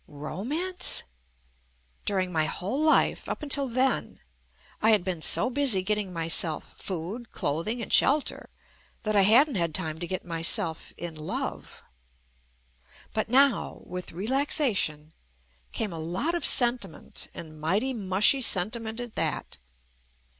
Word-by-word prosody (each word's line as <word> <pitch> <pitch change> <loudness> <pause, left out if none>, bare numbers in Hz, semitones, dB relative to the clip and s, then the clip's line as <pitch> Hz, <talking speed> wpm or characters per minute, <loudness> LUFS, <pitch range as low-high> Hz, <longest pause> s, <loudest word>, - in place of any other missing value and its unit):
Romance? 280 - 0 1.0
Dur 200 - 0
ing 185 -1 -1
my 160 -2 +1
whole 195 - -3
life, 310 0 +2
up - - -5
until 280 -1 +1
then, 255 +2 0 0.6
I 220 - +4
had 210 -4 +4
been 180 -3 -4
so 250 - +3
busy 255 -8 +2
getting 210 -1 -2
myself 165 -1 0
food, 195 +7 -5
clothing 215 +11 -3
and - - -5
shelter 290 +2 +3 0.5
that 215 -1 -1
I 200 - +6
hadn't 245 +7 +5
had 165 -2 -1
time 160 -3 -2
to 175 - -5
get 185 +1 -4
myself 165 0 +1
in 175 -1 -5
love. 155 0 -6 1.3
But 215 0 -2
now, 265 -1 +3
with 180 0 -7
relaxation, 200 - -1 0.6
came 210 -5 -2
a 165 - -6
lot 180 - -2
of 345 - +2
senti 245 0 +4
ment 155 - -7
and 155 -2 -10
mighty 205 +12 0
mushy 205 +4 +2
sentiment 220 +2 +1
at 240 -2 -7
that. 70 - -3
205 Hz, 135 wpm, -26 LUFS, 170-250 Hz, 1.3 s, I